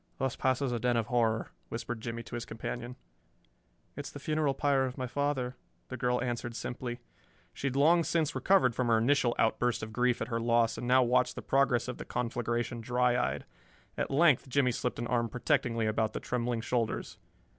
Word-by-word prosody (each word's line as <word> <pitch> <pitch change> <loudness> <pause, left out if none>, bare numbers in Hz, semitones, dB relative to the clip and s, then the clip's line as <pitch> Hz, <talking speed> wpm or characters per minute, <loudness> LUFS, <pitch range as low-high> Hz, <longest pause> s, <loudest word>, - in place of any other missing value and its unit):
"Thus 135 -1 -1
passes 130 0 0
a 120 - -1
den 120 0 +1
of 115 - +1
horror," 115 -1 0 0.2
whispered 115 0 -5
Jimmie 115 +1 -5
to 105 - -13
his 120 -1 -3
companion. 120 +2 -6 1.0
"It - - -5
is - - -9
the - - -8
funeral 155 -3 0
pyre 140 -2 +2
of 125 - -7
my 130 - -2
father," 130 -1 -1 0.3
the 130 - -4
girl 125 0 0
answered 120 -1 -3
simply. 120 0 -5 0.5
She 140 - -3
had 130 - -2
long 165 +5 +5
since 165 -1 0
recovered 185 -11 +3
from 125 +1 -1
her 115 -1 +4
initial 120 +1 +2
outburst 115 +1 +1
of 110 0 -6
grief 125 +1 +2
at 115 - -3
her 115 -1 -1
loss, 115 -1 +2
and 120 +2 -5
now 130 +1 +5
watched 125 +1 +2
the - - -6
progress 130 -3 +2
of 125 - -5
the - - -6
conflagration 120 0 -2
dry 125 +1 +2
eyed. 125 - -1 0.5
At - - -2
length 140 -2 +4
Jimmie 130 -1 +3
slipped 125 +1 -2
an 120 - -3
arm 120 -1 0
protectingly 115 -1 0
about 110 0 0
the - - -3
trembling 120 -1 -2
shoulders. 115 -1 -2
125 Hz, 200 wpm, -31 LUFS, 115-130 Hz, 1.0 s, long